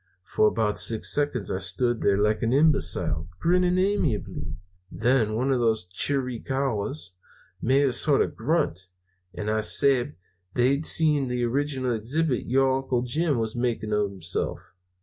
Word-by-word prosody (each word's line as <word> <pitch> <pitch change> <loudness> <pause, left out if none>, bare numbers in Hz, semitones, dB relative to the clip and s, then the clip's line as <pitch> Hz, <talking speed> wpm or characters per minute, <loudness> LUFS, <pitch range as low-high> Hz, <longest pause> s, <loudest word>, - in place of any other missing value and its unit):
For 110 - +2
about 105 -1 0
six 110 -2 +1
seconds 145 0 -1
I 95 - -1
stood 115 +6 -1
there 100 -1 +2
like 105 +1 +1
an 115 +1 +1
imbecile, 90 - +1
grinning 180 +1 +2
amiably. 110 - -1 0.4
Then 110 +2 +1
one 130 +4 0
of 130 - +2
the 115 -2 +3 0.2
Chiricahuas 125 - -1 0.5
made 135 +4 +3
a 130 - +1
sort 140 +2 +2
of - - -6
grunt, 115 - -1 0.5
and 105 +4 -5
I 110 0 +1
sabed 130 +3 +2
that - - -30 0.4
they'd 135 +5 +2
seen 150 -4 +3
the 125 0 -2
original 130 0 -1
exhibit 125 +5 -1
your 130 +1 +2
Uncle 130 -2 -1
Jim 150 +3 0
was 110 0 -2
making 120 -3 -2
of 105 -1 +1
himself. 95 -3 -4
125 Hz, 150 wpm, -25 LUFS, 105-140 Hz, 0.5 s, the